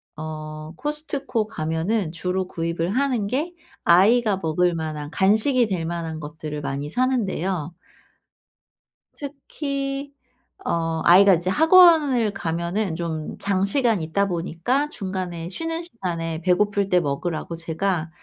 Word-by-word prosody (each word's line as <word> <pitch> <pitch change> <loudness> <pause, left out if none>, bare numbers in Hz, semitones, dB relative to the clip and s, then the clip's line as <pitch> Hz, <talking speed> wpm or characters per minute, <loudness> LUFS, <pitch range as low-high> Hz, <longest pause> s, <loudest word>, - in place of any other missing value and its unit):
어 155 0 -7
코스트코 290 - -2
가면은 165 +1 -1
주로 180 +2 -2
구입을 170 0 -2
하는 255 -7 +1
게 295 - -2 0.3
아이가 205 +4 +5
먹을 175 +2 +1
만한 155 -2 -4
간식이 220 +6 +3
될 180 -5 -2
만한 165 -1 -4
것들을 150 0 -6
많이 140 +1 -3
사는데요. 190 - -1 1.4
특히 275 -1 -4 0.5
어 165 -1 -1
아이가 190 +2 +7
이제 175 +2 -2
학원을 310 - +5
가면은 170 +1 -2
좀 160 -2 -4
장시간 200 +2 +1
있다 180 +6 0
보니까 185 - -1
중간에 185 - -4
쉬는 330 - -3
시간에 170 - -4
배고플 200 +3 +2
때 180 - +4
먹으라고 160 +2 -3
제가 170 +1 -2
185 Hz, 260 characters per minute, -23 LUFS, 165-235 Hz, 1.4 s, 아이가